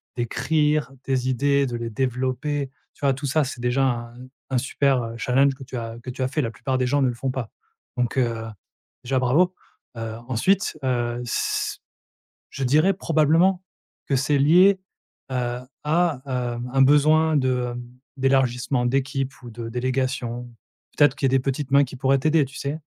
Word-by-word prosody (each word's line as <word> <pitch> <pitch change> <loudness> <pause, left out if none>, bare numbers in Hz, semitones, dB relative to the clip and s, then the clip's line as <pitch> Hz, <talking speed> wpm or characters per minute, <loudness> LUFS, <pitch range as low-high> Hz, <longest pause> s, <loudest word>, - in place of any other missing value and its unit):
d'écrire 150 +4 0
des 130 -1 0
idées, 140 +2 +2
de 120 -2 -4
les 115 -1 -4
développer, 130 +4 -2 0.2
tu - - -27
vois? 135 - +4
Tout 140 +2 -6
ça 150 +3 +2
c'est 130 -2 -6
déjà 125 +2 +1
un 120 -2 -1 0.4
un 130 - +2
super, 135 0 +1
heu, 115 0 -6
challenge 135 +3 +2
que 135 - -11
tu 130 - -9
as 115 -1 -5
que 125 - -5
tu 130 - -7
as 130 - +2
fait, 150 +3 -1
la 115 -3 -2
plupart 130 +4 -2
des 130 - +1
gens 140 +3 +1
ne 130 - +3
le 120 - -2
font 130 +2 -2
pas 125 -4 -4 0.5
donc 125 +1 -1
heu, 115 -3 0 0.6
déjà, 130 +1 0
bravo, 165 +9 +3 0.4
heu, 115 -1 -4
ensuite, 155 - +1
heu, 120 -2 -1
s 120 - -1 0.7
je 135 - -4
dirais 155 +9 +4
probablement 165 +3 +2 0.5
que 135 - +2
c'est 140 +2 +1
lié, 180 +7 +6 0.5
heu, 125 -1 -2 0.3
à, 160 -4 +1
hem, 125 -1 -3
un 135 - +2
besoin 155 +3 +4
de, 125 -2 0
hem, 120 - -6 0.4
d'élargissement 130 -1 +1
d'équipe 135 +1 -1
ou 120 - -9
de 115 0 -7
délégation. 125 -1 -2 0.5
Peut-être 145 -3 +4
qu'il 135 - 0
y - - +2
a - - +6
des - - -1
petites 135 +1 -3
mains 140 0 +6
qui 130 - -9
pourraient 135 +1 +2
t'aider, 155 +1 +3
tu 140 - -13
sais? 140 +3 -3
130 Hz, 185 wpm, -23 LUFS, 125-145 Hz, 0.7 s, lié